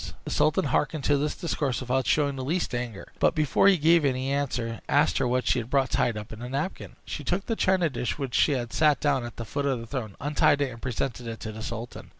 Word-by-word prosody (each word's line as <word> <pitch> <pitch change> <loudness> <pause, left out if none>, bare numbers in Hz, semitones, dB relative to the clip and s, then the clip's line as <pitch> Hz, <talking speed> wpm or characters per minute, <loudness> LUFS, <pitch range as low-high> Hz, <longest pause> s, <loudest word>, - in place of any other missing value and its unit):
The - - -5
sultan 155 - +2
hearkened 145 +2 0
to 145 +1 +3
this 150 +1 -1
discourse 145 -7 -1
without 130 +1 -1
showing 145 -2 +2
the 130 - -4
least 165 +2 -1
anger; 120 -4 -5
but, - - +3
before 155 +5 +3
he 195 -2 +6
gave 165 +2 +5
her 140 - +3
any 130 +1 -2
answer, 120 -6 -2
asked - - +3
her - - +1
what 125 +1 0
she - - +2
had 115 0 -6
brought 135 -2 +1
tied 115 -3 +1
up 105 0 -7
in 110 - -9
the 125 +1 -6
napkin. 140 +8 -4
She 150 - -5
took 180 +7 -1
the 225 - -1
china 185 -4 +2
dish, 125 -4 -3
which 135 -4 -4
she 150 - +4
had 120 -3 -3
set 150 -2 +3
down 140 -4 +1
at 120 -1 -7
the 115 - -5
foot 140 +7 -2
of 135 -3 0
the 115 - -7
throne, 115 -5 -5
untied 145 0 +2
it, 140 -2 0
and 115 -1 -11
presented 125 -1 -3
it 115 -1 -5
to 110 - -5
the 110 +1 -8
sultan. 115 +2 -6
135 Hz, 260 wpm, -27 LUFS, 120-150 Hz, -, he